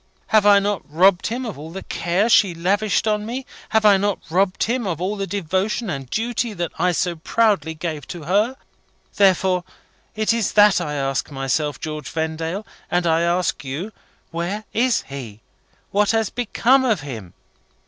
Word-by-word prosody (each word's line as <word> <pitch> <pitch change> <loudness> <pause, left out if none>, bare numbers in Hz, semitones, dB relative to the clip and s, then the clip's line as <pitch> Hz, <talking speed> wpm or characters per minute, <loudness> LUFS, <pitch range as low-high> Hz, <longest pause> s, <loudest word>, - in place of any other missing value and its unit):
Have 215 -2 +4
I 205 -1 +8
not 200 -1 0
robbed 180 +3 +4
him 245 +3 -3
of 210 -11 -6
all 155 +2 -8
the 190 +4 -7
care 175 +6 0
she 200 -6 +4
lavished 200 +6 +1
on 210 -1 +1
me? 250 +4 -5 0.2
Have 220 -1 +2
I 205 -2 +7
not 200 0 0
even 160 - -9
robbed 190 0 +2
him 235 -1 -1
of 170 -4 -2
all 190 +4 -1
the 195 -1 -3
devotion 195 +3 -1
and 135 -3 -5
duty 230 - -1
that 175 -3 -3
I 180 +2 +3
so 175 0 -1
proudly 200 -2 +1
gave 155 -3 -5
to 170 -3 -7
her? 210 - +1 0.6
Therefore 190 -2 +3 0.5
it 215 +1 +1
is 230 -3 -1
that 205 -3 +6
I 150 -3 -3
ask 135 -1 -1
myself, 135 +1 -1
George 155 -2 -5
Vendale, 160 +5 -3 0.2
and 175 0 +1
I 165 0 +3
ask 170 -3 0
you, 145 +11 -5 0.4
where 175 +6 -3
is 240 +1 +2
he? 120 -6 -9 0.5
What 205 0 +2
has 225 -3 -1
become 245 +2 +2
of 220 - +1
him?" 115 -11 -8
185 Hz, 180 wpm, -21 LUFS, 160-215 Hz, 0.6 s, I